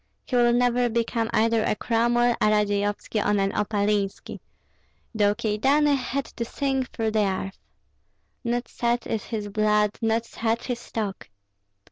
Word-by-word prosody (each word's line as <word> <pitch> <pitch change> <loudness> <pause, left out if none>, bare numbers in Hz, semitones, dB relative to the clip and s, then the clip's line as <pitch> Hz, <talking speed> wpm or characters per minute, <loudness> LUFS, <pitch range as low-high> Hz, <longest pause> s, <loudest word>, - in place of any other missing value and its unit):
He 255 - -3
will 240 -1 +5
never 245 0 +2
become 230 0 -1
either 225 0 +2
a - - +1
Cromwell, 240 +1 +2
a - - +4
Radzeyovski, 205 0 0
or 205 0 +2
an 195 0 +1
Opalinski, 205 -1 -1 0.7
though 205 -2 +2
Kyedani 270 +7 +2
had 270 +1 -2
to 235 - -5
sink 265 +1 -2
through 225 -2 -2
the 215 - +1
earth. 190 0 -4 0.8
Not 240 0 -1
such 240 0 -1
is 220 -2 -3
his 215 -3 -4
blood, 210 0 +1
not 225 0 +1
such 230 +1 -2
his 245 -2 -3
stock." 210 - -5
225 Hz, 145 wpm, -25 LUFS, 210-240 Hz, 0.8 s, will